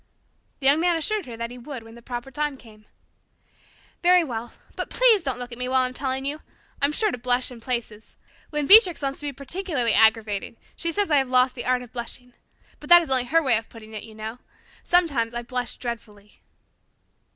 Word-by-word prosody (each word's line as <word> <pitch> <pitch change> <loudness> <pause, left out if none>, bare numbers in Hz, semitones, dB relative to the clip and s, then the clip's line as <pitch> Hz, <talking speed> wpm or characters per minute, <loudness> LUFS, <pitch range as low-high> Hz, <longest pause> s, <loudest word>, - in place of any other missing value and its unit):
The - - -6
Young 280 +3 +5
Man 345 0 +2
assured 410 +3 -2
her 235 -2 -8
that 235 +1 -5
he 250 - -10
would 250 -1 -8
when 225 0 -14
the 235 - -14
proper 245 +2 -7
time 295 0 -3
came. 215 -4 -18 1.1
"Very 360 0 +5
well. 240 -5 -6 0.2
But - - -4
please 475 -5 +4
don't 265 -5 -3
look 245 0 -7
at 235 - -8
me 250 0 -3
while 260 0 +3
I'm 255 0 -2
telling 265 0 -3
you. 295 +2 -3 0.4
I'll 280 - +3
be 300 - -5
sure 430 - +1
to 250 - -6
blush 250 +1 +1
in 235 -2 -12
places. 230 -3 -5 0.3
When 295 -1 -2
Beatrix 380 -4 +7
wants 275 0 -2
to 295 - -5
be - - -2
particularly 280 - -2
aggravating 220 -1 +2 0.2
she 335 - 0
says 405 0 -1
I 295 - +5
have 265 -2 +1
lost 255 0 +3
the 245 - -6
art 250 0 +1
of 240 - -14
blushing. 245 +1 -7 0.5
But 295 - -12
that 345 0 +8
is 310 - -8
only 255 -2 +3
her 325 +6 +2
way 255 -4 +3
of 225 - -16
putting 220 -1 -13
it, 215 - -6
you 220 - -13
know. 220 +3 -7 0.4
Sometimes 280 -10 +2
I 240 - -3
blush 250 0 -4
dreadfully." 210 -4 -9
255 Hz, 220 wpm, -24 LUFS, 235-295 Hz, 1.1 s, that